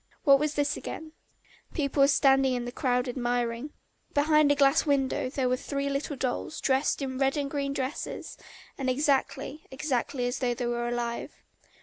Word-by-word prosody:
What 275 -3 +6
was 300 0 -1
this 290 0 +1
again? 315 0 -7 0.6
People 280 -3 0
were 275 - +7
standing 270 -2 +4
in 245 0 -3
a - - -4
crowd 250 0 0
admiring. 245 +1 -1 0.5
Behind 300 0 +4
a - - +4
glass 275 -1 +4
window 275 -3 +1
there 260 -1 -1
were 255 0 +1
three 280 +1 -3
little 280 +1 -2
dolls, 260 +4 -3
dressed 270 +1 +1
in 260 -1 -4
red 270 +1 +2
and 280 -1 -2
green 280 -2 -1
dresses, 270 0 -4 0.4
and 265 -1 0
exactly, 275 +2 0
exactly 265 -2 -2
as 245 +1 -2
though 245 -2 0
they 245 - -3
were 240 0 -1
alive. 240 -1 -3
270 Hz, 170 wpm, -28 LUFS, 250-285 Hz, 0.6 s, were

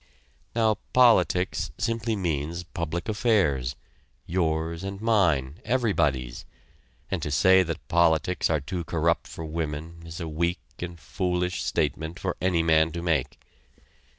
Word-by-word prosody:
Now 110 -2 +3 0.2
politics 95 -8 +4
simply 115 +1 -1
means 85 -2 -2
public 85 -1 -4
affairs 95 - +1 0.5
yours 80 -1 -1
and 95 0 -5
mine, 85 - +1
everybody's 75 - 0 0.7
and 95 -4 -1
to 75 - -3
say 95 +6 +5
that 80 -8 -4
politics 85 +1 +2
are 80 -3 +1
too 85 +5 -4
corrupt 85 +1 0
for 80 - -7
women 80 +1 -4
is 80 +1 -8
a 85 - -4
weak 85 +3 -1 0.2
and 85 -1 -6
foolish 90 +1 -1
statement 80 +4 -1
for - - -2
any 90 -3 +2
man 80 0 +4
to 85 0 -4
make. 80 -7 0
85 Hz, 130 wpm, -26 LUFS, 80-95 Hz, 0.7 s, say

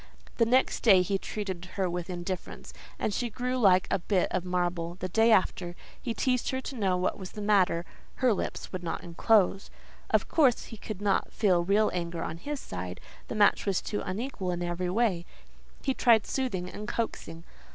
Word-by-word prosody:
The 230 - +3
next 255 +3 +3
day 195 -5 +6
he 195 +1 -1
treated 190 -5 -5
her 190 -2 +1
with 175 0 -4
indifference, 180 0 -5 0.2
and 210 - -1
she 240 +4 -1
grew 250 +3 -2
like 190 -5 +5
a - - +2
bit 185 +1 +1
of 185 - -1
marble. 175 -2 -1
The 185 0 -4
day 225 +5 +4
after, 185 -3 +2 0.3
he 235 -3 -3
teased 250 -2 +1
her 260 - -1
to 265 - -6
know 195 -6 +1
what 180 +3 -1
was 185 -2 -8
the - - -7
matter; 185 -5 +3 0.3
her 255 -3 +3
lips - - -4
would 185 - -4
not 170 - -4
unclose. 195 +3 +2 0.4
Of - - +2
course 270 -7 +3
he 225 - -10
could 205 -1 -7
not 200 -2 +1
feel 185 -6 +2
real 205 +4 +3
anger 170 -1 -3
on 160 - -4
his 285 +10 -5
side: 90 - -6 0.3
the - - -5
match 205 0 +4
was 195 -2 +2
too 205 - -3
unequal 200 0 -4
in 175 0 -2
every 175 +1 -2
way; 195 -4 +1 0.6
he 270 - +1
tried 230 -4 +4
soothing 220 -10 -2
and 210 +3 -7
coaxing. 165 -8 -4
190 Hz, 195 wpm, -29 LUFS, 175-225 Hz, 0.6 s, day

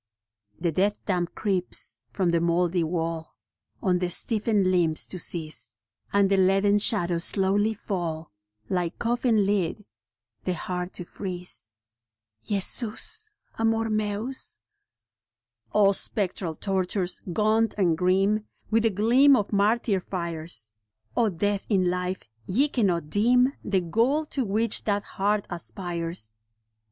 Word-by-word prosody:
The 170 -1 0
death 200 +5 +1
damp 175 -3 -1
creeps 190 -4 +1
from 185 -3 0
the 170 - +2
mouldy 170 +1 +1
wall 165 -1 -3 0.5
On 180 -3 +2
the 180 -1 -1
stiffened 210 -1 +1
limbs 165 -4 +2
to 185 - -7
seize, 155 -8 -1 0.4
And 200 -1 +3
the 195 0 +2
leaden 195 +2 +3
shadows 175 -5 +3
slowly 205 +4 +2
fall, 170 - -4 0.4
Like 175 +1 -2
coffin 235 -3 +1
lid, 200 0 -1 0.6
the 185 - -1
heart 180 +2 -4
to 180 - -4
freeze. 180 - -5 0.7
Jesus 230 - +1 0.3
Amor 225 0 +1
Mens. 215 +4 0 1.1
O 200 -2 +4
spectral 190 -4 -2
tortures, 185 -1 -1
gaunt 220 +4 +1
and 175 -5 +2
grim 195 +5 +1 0.2
With 225 +1 +3
the 225 - +3
gleam 240 +8 +5
of 210 -3 -1
martyr 205 0 +2
fires 165 - -4 0.2
— 110 0 -41
O 225 - +3
death 200 +2 -2
in 185 -4 +2
life, 180 +1 -3 0.2
ye 270 +10 +2
cannot 175 - 0
dim 250 +5 +3
The 195 -2 +1
goal 235 - +1
to 275 -3 -2
which 215 +2 +1
that 205 -1 0
heart 205 +1 -1
aspires. 170 - -5
195 Hz, 125 wpm, -26 LUFS, 175-215 Hz, 1.1 s, gleam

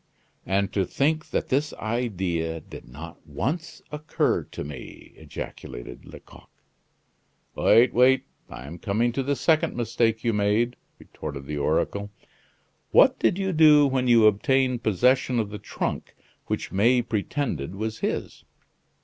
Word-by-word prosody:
"And 95 +1 0
to 100 - +1
think 155 - -1
that - - -2
this 145 +3 0
idea 95 -8 -2
did - - -12
not 80 +7 -11
once 155 - -4
occur 150 +1 0
to - - -7
me!" 70 -2 -10
ejaculated - - -9
Lecoq. - - -14 1.0
"Wait, 115 +3 +4
wait, 130 +2 +4 0.2
I 60 - -9
am 85 +5 -9
coming 115 +7 0
to 135 - -2
the 140 +2 -1
second 155 +4 +1
mistake 115 -1 0
you 115 -1 +1
made," 105 +4 +1 0.2
retorted 70 -1 -8
the 75 +1 -4
oracle. 100 +7 -1 0.8
"What - - +5
did 115 - +2
you 195 -1 -1
do 155 -2 +6
when 130 -2 0
you 115 -2 +6
obtained 125 +4 +2
possession 125 +4 +2
of 105 -2 -2
the 105 - -6
trunk - - -4 0.3
which - - -3
May 120 +5 +3
pretended 100 - -3
was 110 +2 -4
his? - - -3
115 Hz, 140 wpm, -25 LUFS, 95-130 Hz, 1.0 s, do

